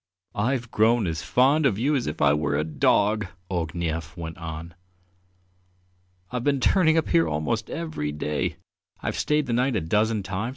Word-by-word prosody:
"I've 120 Hz, +2 st, -1 dB
grown 110 Hz, 0 st, +3 dB
as 80 Hz, -2 st, -2 dB
fond 130 Hz, -, +3 dB
of 100 Hz, -, 0 dB
you 140 Hz, +7 st, +1 dB
as 130 Hz, -, -1 dB
if 75 Hz, -, -2 dB
I 70 Hz, -1 st, +5 dB
were 75 Hz, -1 st, 0 dB
your 75 Hz, -, +1 dB
dog," 100 Hz, +7 st, +2 dB, 0.2 s
Ognev 85 Hz, -1 st, -3 dB
went 80 Hz, -1 st, -6 dB
on. 80 Hz, 0 st, -7 dB, 1.6 s
"I've 125 Hz, -1 st, -3 dB
been 140 Hz, 0 st, +2 dB
turning 165 Hz, +2 st, +3 dB
up 160 Hz, -, +1 dB
here 85 Hz, 0 st, +3 dB
almost 80 Hz, +9 st, -2 dB
every 155 Hz, -, -3 dB
day; 75 Hz, 0 st, -2 dB, 0.5 s
I've -, -, -2 dB
stayed 150 Hz, 0 st, +1 dB
the 120 Hz, -, -2 dB
night 125 Hz, +1 st, +1 dB
a -, -, +1 dB
dozen 105 Hz, +5 st, +1 dB
times. 95 Hz, +5 st, -3 dB
105 Hz, 170 wpm, -25 LUFS, 80-125 Hz, 1.6 s, I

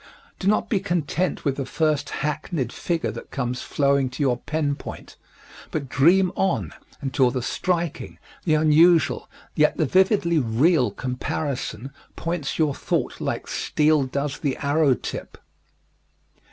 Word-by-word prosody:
Do 190 Hz, -, -2 dB
not 210 Hz, -, +2 dB
be 205 Hz, -, +1 dB
content 170 Hz, 0 st, -1 dB
with 140 Hz, -2 st, 0 dB
the 135 Hz, -, -2 dB
first 155 Hz, -2 st, 0 dB
hackneyed 150 Hz, -3 st, -3 dB
figure 165 Hz, -10 st, -2 dB
that 115 Hz, -, -9 dB
comes 125 Hz, -1 st, -3 dB
flowing 140 Hz, -2 st, +1 dB
to 130 Hz, +4 st, -3 dB
your 125 Hz, -3 st, +2 dB
pen 150 Hz, +2 st, -1 dB
point, -, -, -9 dB, 0.5 s
but 140 Hz, -4 st, -4 dB
dream 175 Hz, +8 st, +4 dB
on 110 Hz, -, 0 dB, 0.3 s
until 135 Hz, -2 st, +2 dB
the 125 Hz, -1 st, -3 dB
striking, 170 Hz, +2 st, -2 dB, 0.3 s
the 155 Hz, -3 st, +2 dB
unusual, 160 Hz, +1 st, +4 dB, 0.2 s
yet 150 Hz, 0 st, +3 dB
the 155 Hz, -, +2 dB
vividly 185 Hz, -, +3 dB
real 130 Hz, +4 st, +3 dB
comparison 130 Hz, -1 st, -4 dB, 0.2 s
points 165 Hz, -5 st, -3 dB
your 155 Hz, -3 st, +2 dB
thought -, -, -2 dB
like -, -, -2 dB
steel 155 Hz, 0 st, +2 dB
does 140 Hz, +2 st, -3 dB
the 140 Hz, -3 st, -1 dB
arrow 145 Hz, -1 st, +2 dB
tip. -, -, -7 dB
150 Hz, 140 wpm, -24 LUFS, 135-165 Hz, 0.5 s, dream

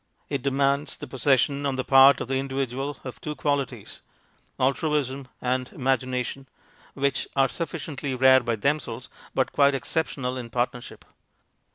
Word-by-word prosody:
It 140 Hz, -3 st, -2 dB
de 140 Hz, -, +1 dB
mands 140 Hz, +1 st, 0 dB
the -, -, -7 dB
possession 140 Hz, +2 st, +1 dB
on 140 Hz, -2 st, 0 dB
the 130 Hz, -, -1 dB
part 135 Hz, +1 st, +7 dB
of -, -, -4 dB
the 135 Hz, 0 st, 0 dB
individual 135 Hz, +1 st, -3 dB
of 130 Hz, -, -8 dB
two 150 Hz, -1 st, -4 dB
qualities 145 Hz, -4 st, -2 dB, 0.6 s
altruism 140 Hz, 0 st, 0 dB
and 125 Hz, 0 st, -1 dB
imagination, 130 Hz, 0 st, -1 dB, 0.5 s
which 140 Hz, -1 st, 0 dB
are 135 Hz, -1 st, +4 dB
sufficiently 145 Hz, -3 st, -4 dB
rare 130 Hz, +1 st, +6 dB
by 120 Hz, -2 st, -1 dB
themselves, 130 Hz, -1 st, -2 dB, 0.3 s
but 130 Hz, -, +1 dB
quite 140 Hz, -1 st, +4 dB
exceptional 135 Hz, -3 st, -2 dB
in 120 Hz, -2 st, -6 dB
partner 120 Hz, +1 st, -1 dB
ship. -, -, -12 dB
135 Hz, 150 wpm, -25 LUFS, 130-140 Hz, 0.6 s, part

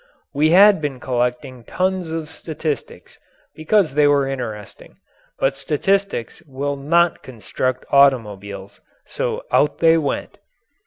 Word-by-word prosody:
We 150 Hz, +2 st, +2 dB
had 195 Hz, +1 st, +6 dB
been 140 Hz, -4 st, -4 dB
collecting 125 Hz, 0 st, -3 dB
tons 185 Hz, +3 st, -2 dB
of 160 Hz, -1 st, -5 dB
statistics 155 Hz, -2 st, -6 dB, 0.3 s
because 160 Hz, 0 st, +1 dB
they 150 Hz, 0 st, +4 dB
were 140 Hz, -1 st, +2 dB
interesting. 115 Hz, -6 st, -7 dB, 0.4 s
But 135 Hz, 0 st, 0 dB
statistics 160 Hz, -, -1 dB
will 140 Hz, +1 st, -3 dB
not 170 Hz, +5 st, +1 dB
construct 130 Hz, +1 st, -4 dB
automobiles 100 Hz, -8 st, +1 dB, 0.2 s
so -, -, -4 dB
out 150 Hz, -, +2 dB
they 165 Hz, 0 st, +4 dB
went. 145 Hz, -3 st, -4 dB
145 Hz, 115 wpm, -20 LUFS, 130-165 Hz, 0.4 s, had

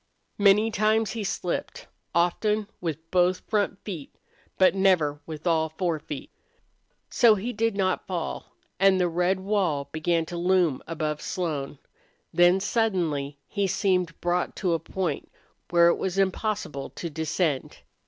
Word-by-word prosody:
Many 205 Hz, +2 st, +5 dB
times 215 Hz, +1 st, +2 dB
he 225 Hz, -2 st, -4 dB
slipped, 180 Hz, -2 st, -3 dB, 0.3 s
often 210 Hz, +5 st, +1 dB
with 165 Hz, -1 st, -5 dB
both 180 Hz, 0 st, +3 dB
front 205 Hz, -2 st, 0 dB
feet, 170 Hz, -9 st, -6 dB, 0.5 s
but 185 Hz, -, +5 dB
never 180 Hz, -7 st, +2 dB
with 155 Hz, 0 st, -8 dB
all 160 Hz, -2 st, +2 dB
four 165 Hz, 0 st, -1 dB
feet. 145 Hz, -1 st, -8 dB, 0.8 s
So 235 Hz, -4 st, +6 dB
he 225 Hz, +5 st, -4 dB
did 225 Hz, -1 st, 0 dB
not 185 Hz, -2 st, 0 dB
fall. 180 Hz, -3 st, -4 dB, 0.3 s
And 195 Hz, 0 st, +5 dB
the 180 Hz, -, +3 dB
red 180 Hz, +3 st, 0 dB
wall 185 Hz, -8 st, 0 dB
began 165 Hz, +1 st, 0 dB
to 175 Hz, +2 st, -6 dB
loom 175 Hz, -5 st, +2 dB
above 155 Hz, -2 st, -3 dB
Sloan. 150 Hz, -6 st, -3 dB, 0.6 s
Then 175 Hz, +2 st, +5 dB
suddenly 175 Hz, -10 st, 0 dB
he 200 Hz, -2 st, -1 dB
seemed 180 Hz, -3 st, 0 dB
brought 175 Hz, +1 st, 0 dB
to 180 Hz, -4 st, 0 dB
a 165 Hz, -, +1 dB
point 185 Hz, 0 st, -3 dB, 0.4 s
where 170 Hz, -1 st, +6 dB
it -, -, +1 dB
was 190 Hz, 0 st, -2 dB
impossible 195 Hz, -7 st, -1 dB
to 170 Hz, -, -6 dB
descend. 160 Hz, -2 st, -1 dB
180 Hz, 145 wpm, -26 LUFS, 160-195 Hz, 0.8 s, So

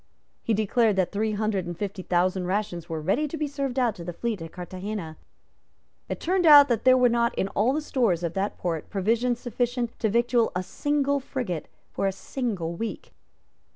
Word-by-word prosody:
He 225 Hz, -, 0 dB
declared 220 Hz, +1 st, +2 dB
that 190 Hz, -2 st, +1 dB
three 215 Hz, +1 st, -1 dB
hundred 205 Hz, -4 st, -1 dB
and 175 Hz, -1 st, -5 dB
fifty 200 Hz, -1 st, -4 dB
thousand 180 Hz, +1 st, 0 dB
rations 185 Hz, -4 st, -2 dB
were 160 Hz, -1 st, -3 dB
ready 195 Hz, -, 0 dB
to 320 Hz, -, -5 dB
be 305 Hz, -, -1 dB
served 275 Hz, -3 st, -3 dB
out 245 Hz, -4 st, +2 dB
to 170 Hz, -, -7 dB
the 175 Hz, -, -4 dB
fleet 220 Hz, 0 st, -3 dB
at 165 Hz, -1 st, -7 dB
Carthagena. 185 Hz, -1 st, -6 dB, 0.9 s
It -, -, -3 dB
turned 360 Hz, 0 st, +1 dB
out 290 Hz, -2 st, +9 dB
that 235 Hz, -1 st, 0 dB
there 255 Hz, 0 st, +7 dB
were 250 Hz, -1 st, +5 dB
not 235 Hz, 0 st, +1 dB
in 190 Hz, -, 0 dB
all 220 Hz, +6 st, +2 dB
the 305 Hz, +3 st, -1 dB
stores 230 Hz, -, 0 dB
of 170 Hz, -1 st, -2 dB
that 195 Hz, +3 st, -2 dB
port 165 Hz, -3 st, -3 dB
provisions 230 Hz, +5 st, 0 dB
sufficient 245 Hz, 0 st, -2 dB
to 220 Hz, -, +1 dB
victual 235 Hz, +1 st, +2 dB
a 180 Hz, -, -1 dB
single 285 Hz, +8 st, 0 dB
frigate 245 Hz, -, -4 dB, 0.2 s
for 195 Hz, -, -1 dB
a -, -, +1 dB
single 195 Hz, -5 st, -3 dB
week. 225 Hz, +6 st, -6 dB
215 Hz, 195 wpm, -26 LUFS, 185-250 Hz, 0.9 s, out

